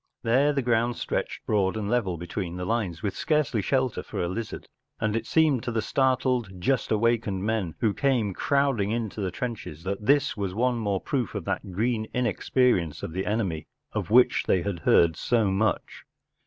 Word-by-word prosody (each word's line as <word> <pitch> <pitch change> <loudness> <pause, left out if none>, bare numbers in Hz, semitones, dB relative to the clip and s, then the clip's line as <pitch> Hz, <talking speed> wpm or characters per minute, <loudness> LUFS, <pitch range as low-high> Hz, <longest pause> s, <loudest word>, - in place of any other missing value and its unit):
There 135 +6 +3
the 140 -2 -1
ground 120 0 +1
stretched - - -3
broad 100 -1 +1
and 105 -2 -3
level 105 -6 0
between 85 +1 -5
the 90 - -4
lines, 95 -6 -2
with 100 - -2
scarcely 150 -8 +1
shelter 130 -2 0
for - - -6
a 85 - 0
lizard, 110 +5 -5 0.3
and 110 -1 0
it 115 - -2
seemed 155 -6 +3
to 120 - -3
the 110 -2 -1
startled, 125 -6 +1
just 130 +8 0
awakened 110 -3 +1
men 105 -6 -1
who 110 -3 +2
came 120 -7 +1
crowding 140 -5 +1
into 110 -2 -2
the 95 - -1
trenches 95 -7 -5
that 100 +2 -3
this 140 +4 +3
was 100 -3 -3
one 120 +1 +1
more 100 -4 -1
proof 125 -6 -2
of 100 - -4
that 95 0 -3
green 110 +3 0
inexperience 120 - +1
of - - -5
the 95 +2 -3
enemy 100 -8 -1 0.2
of - - -3
which 125 +3 +5
they 90 - +2
had 100 -4 -3
heard 80 +1 +4
so 110 -1 +1
much. 105 +3 -1
110 Hz, 185 wpm, -26 LUFS, 95-125 Hz, 0.3 s, which